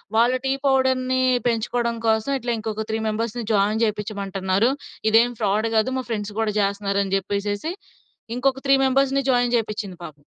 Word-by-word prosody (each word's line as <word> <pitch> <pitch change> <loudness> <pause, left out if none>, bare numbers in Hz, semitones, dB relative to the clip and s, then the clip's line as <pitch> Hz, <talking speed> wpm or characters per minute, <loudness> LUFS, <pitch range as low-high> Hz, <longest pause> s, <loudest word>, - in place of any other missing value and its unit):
వాళ్ళ 240 +3 +4
టీ 265 - +1
పౌడర్‌ని 260 -1 +2 0.3
పెంచుకోవడం 235 +1 0
కోసం 220 +5 +1
ఇట్లా 240 0 -3
ఇంకొక 220 0 -4
త్రీ 220 - -1
మెంబర్స్‌ని 230 +2 -2
జాయిన్ 210 +3 +2
చేపించమంటున్నారు. 200 0 -1 0.4
ఇదేం 230 +2 +5
ఫ్రాడ్ 215 +1 +1
కాదు. 220 +3 +3
మా 260 - -2
ఫ్రెండ్స్ 210 -2 -3
కూడా 215 -1 0
చేస్తున్నారని" 200 -1 0
చెప్పేసేసి 205 - -2 0.6
ఇంకొక 265 +1 +1
త్రీ 275 - +6
మెంబర్స్‌ని 275 +1 +2
జాయిన్ 245 -1 +2
చేపించింది 215 -4 -4
పాపం. 155 - -9
220 Hz, 145 wpm, -23 LUFS, 205-245 Hz, 0.6 s, త్రీ